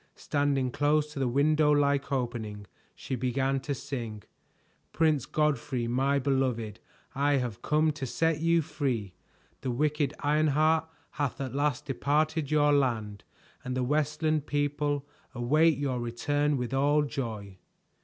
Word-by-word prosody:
Standing 140 -3 0
close 150 +2 +1
to 140 - -5
the 135 - +1
window 150 +4 +3
like 140 -1 +2
opening 115 -6 -3 0.3
she - - -6
began 130 +2 0
to 140 +1 -3
sing: 115 -6 -6 0.7
"Prince 155 -5 +2
Godfrey, 140 -5 0
my 135 +4 +1
beloved, 125 -6 -1 0.3
I 145 +2 +2
have 120 -5 -1
come 155 +1 +2
to 145 -3 -5
set 160 +4 0
you 165 0 +3
free. 125 - -2 0.5
The 130 - -3
wicked 150 +3 0
Ironheart 155 +2 +2 0.2
hath 145 -3 -2
at 130 -3 -4
last 145 -2 0
departed 150 +3 0
your 150 -1 +4
land 115 -7 0 0.4
And 125 0 -3
the 130 - +1
Westland 150 +2 0
people 145 0 -1 0.3
await 150 +5 +3
your 135 -3 -1
return 145 +5 0
with 125 0 -3
all 145 +2 +3
joy." 110 -9 -5
140 Hz, 135 wpm, -29 LUFS, 125-150 Hz, 0.7 s, your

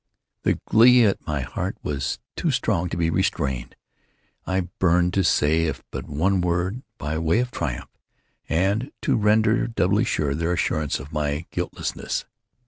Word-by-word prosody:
The - - +1
glee 120 +1 +6
at 100 - 0
my 75 -2 -1
heart 65 - -4
was 70 -3 -2 0.2
too - - 0
strong 85 +1 0
to 85 - -4
be 85 -1 +1
restrained. 70 -9 -1 0.7
I 95 0 +1 0.2
burned 90 0 +3
to 95 - +2
say 80 0 +3
if 80 - -3
but - - -6
one 90 +6 +1
word, 90 +6 -1 0.2
by 75 +2 -3
way 80 +4 +2
of 125 +1 0
triumph, 60 -4 -4 0.6
and 100 +9 +1
to - - +2
render 110 +2 +3
doubly 105 -1 +2
sure 75 - 0
their 85 +4 0
assurance 75 -4 0
of 70 +3 -10
my 75 +1 -1
guiltlessness. 90 -1 -3
85 Hz, 155 wpm, -24 LUFS, 75-100 Hz, 0.7 s, glee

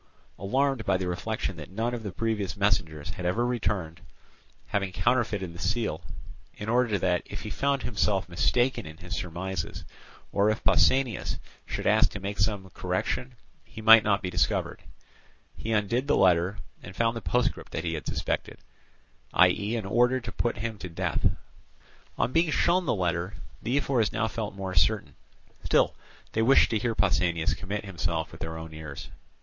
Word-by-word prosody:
Alarmed 130 +5 +1
by 95 -3 +2
the 95 -1 -3
reflection 95 +1 -2
that 75 - -8
none 115 +5 -2
of 120 - -3
the 105 -3 -5
previous 105 -2 -2
messengers 85 -9 0
had 90 - -7
ever 115 +7 +1
returned, 100 -9 -2 0.6
having 100 -2 -1
counterfeited 105 -6 0
the 85 - -11
seal, 105 -3 -1 0.6
in 105 - -6
order 120 -2 +2
that, 90 -1 +1
if - - -7
he - - -6
found 140 -1 0
himself 100 -3 0
mistaken 120 +7 +1
in 80 0 -10
his 90 0 -6
surmises, 90 +1 -4 0.5
or 100 +1 +3
if 110 - -1
Pausanias 130 -4 +3 0.3
should - - -4
ask - - +5
to 105 - -7
make 100 0 -5
some 100 -2 +1
correction, 95 +9 -2 0.3
he - - -12
might 110 0 +8
not 100 -1 +1
be 90 - -2
discovered, - - 0 0.7
he 115 - -5
undid 115 +5 +1
the 145 - +3
letter, 90 +1 +3 0.2
and - - -10
found 115 0 +1
the 115 - -4
postscript 125 +2 0
that 80 - -3
he 85 -1 -1
had 75 - -5
suspected, - - -2 0.8
viz. 100 +5 +4
an 110 -4 -3
order 120 +5 +3
to 120 -1 -7
put 120 - -1
him 110 -1 -4
to 90 - -6
death. 85 - 0 0.9
On 115 - +1
being 165 0 +3
shown 175 +3 +2
the - - +2
letter, 90 +1 -1 0.3
the 125 +4 0
ephors 130 -6 +1
now 110 - 0
felt 110 -2 -4
more 95 -1 -4
certain. 90 -4 +2 0.5
Still, - - +3 0.4
they 110 - 0
wished 130 +5 +5
to 110 - +2
hear 115 +1 -1
Pausanias 85 -5 +2
commit 100 +2 -4
himself 85 -4 -2
with - - -12
their 80 0 -4
own 80 -1 -8
ears. 75 -3 -8
100 Hz, 175 wpm, -28 LUFS, 90-115 Hz, 0.9 s, might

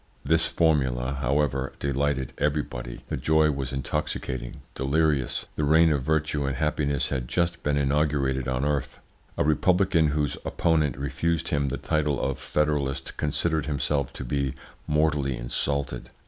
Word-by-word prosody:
This 80 +3 +3
formula, 70 -5 +1
however, 70 0 0
delighted 70 -1 -1
everybody; 70 -5 -2
the - - -1
joy 80 0 +3
was 70 -2 -3
intoxicating, 65 -1 -3
delirious. 70 0 +1
The 75 - -1
reign 80 +2 +5
of 70 -3 +1
virtue 75 +1 0
and 70 - -1
happiness 75 -2 0
had 65 -3 -2
just 85 +4 0
been 75 0 0
inaugurated 70 -2 +1
on 65 +2 0
earth. 75 -2 -1 0.4
A - - +3
republican 85 +2 +3
whose 75 -2 0
opponent 80 -6 +1
refused 75 +4 -1
him 70 -2 +1
the 70 - -3
title 75 -3 0
of 70 - -2
federalist 70 -3 -1
considered 80 0 0
himself 70 -2 0
to - - -6
be 70 +1 -1 0.3
mortally 75 -4 +1
insulted. 70 +2 -1
70 Hz, 140 wpm, -26 LUFS, 65-75 Hz, 0.4 s, reign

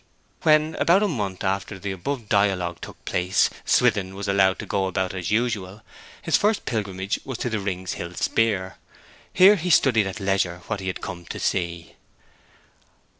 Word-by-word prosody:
When, 155 -1 +4
about 185 +5 +4
a - - +3
month 105 - -3
after 95 0 -2
the 100 +1 -4
above 110 +6 -4
dialogue 95 -4 +1
took - - -11
place, 90 +1 +1
Swithin 95 -1 +2
was 100 +1 -5
allowed 95 -1 +3
to - - -6
go 95 -1 0
about 95 -1 -2
as 90 -2 -4
usual, 105 -3 -1 0.4
his - - +2
first 210 +1 +1
pilgrimage 100 -3 -2
was 130 -3 -5
to 125 -2 -3
the 110 - -1
Rings 95 -2 -3
Hill 85 +1 -7
Speer. 95 -6 0 0.5
Here 195 +3 +7
he 180 +1 -3
studied 120 - +4
at 95 - -6
leisure 95 -3 -1
what 105 - -3
he 95 - -6
had 90 - -3
come 85 -1 -7
to - - -6
see. 85 -2 -2
100 Hz, 175 wpm, -24 LUFS, 95-115 Hz, 0.5 s, Here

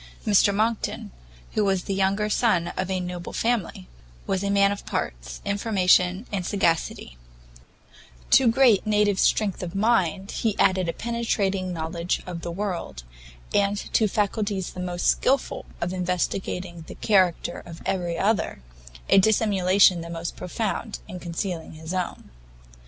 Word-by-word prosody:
Mr 205 -1 +5
Monckton, 220 +2 -1 0.4
who 215 - +1
was 195 -2 +1
the 195 - -3
younger 195 +2 +1
son 205 -6 +2
of 185 0 -3
a 190 -1 0
noble 180 -1 -6
family, 225 - -1 0.4
was 190 0 -1
a 200 - -1
man 200 0 +4
of 200 - -5
parts, - - -4
information 190 -1 +2
and 195 -3 -2
sagacity; 170 - -1 1.1
to 265 - +6
great 230 -3 +4
native 210 -2 +2
strength 205 -3 +2
of 180 0 -6
mind 195 -3 +1
he 220 -3 -1
added 185 -2 +2
a - - -1
penetrating 200 -5 -1
knowledge 170 +1 -2
of 175 -2 -6
the 170 - -5
world, 175 - -4 0.5
and 205 0 +2 0.2
to 220 - +4
faculties 205 -2 -1
the - - -9
most 180 -1 -3
skilful 270 0 +1
of 175 +2 -2
investigating 180 -1 -2
the - - -9
character 185 -5 +1
of 165 -1 -11
every 175 -3 -1
other, 195 - 0 0.4
a - - +6
dissimulation 195 -3 +4
the 170 - -8
most 170 0 -5
profound 215 +4 -3
in 185 -3 -7
concealing 170 -1 -4
his 160 +2 -7
own. 185 -1 -4
190 Hz, 145 wpm, -25 LUFS, 175-210 Hz, 1.1 s, to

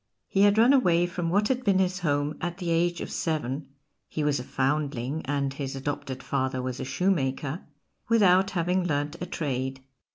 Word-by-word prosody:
He 195 - +1
had 205 +1 +5
run 235 +5 +6
away 175 -10 +4
from 175 -1 -3
what 205 +4 +2
had 255 -1 0
been 200 -4 +3
his 190 0 +1
home 145 -3 0
at 175 -1 -3
the 175 -3 -2
age 175 +1 +1
of - - -5
seven 150 -3 -2 0.4
(he 155 - -3
was 145 -2 +1
a - - -5
foundling, 140 +1 -1
and 140 -1 0
his 135 -1 -4
adopted 135 -1 -4
father 130 -1 -1
was 125 0 -4
a 130 - -3
shoe 180 +8 +1
maker), 140 0 -1 0.5
without 195 -4 +5
having 180 +2 +1
learnt 145 -1 -1
a 180 - -3
trade. 135 -5 -3
155 Hz, 190 wpm, -27 LUFS, 135-180 Hz, 0.5 s, run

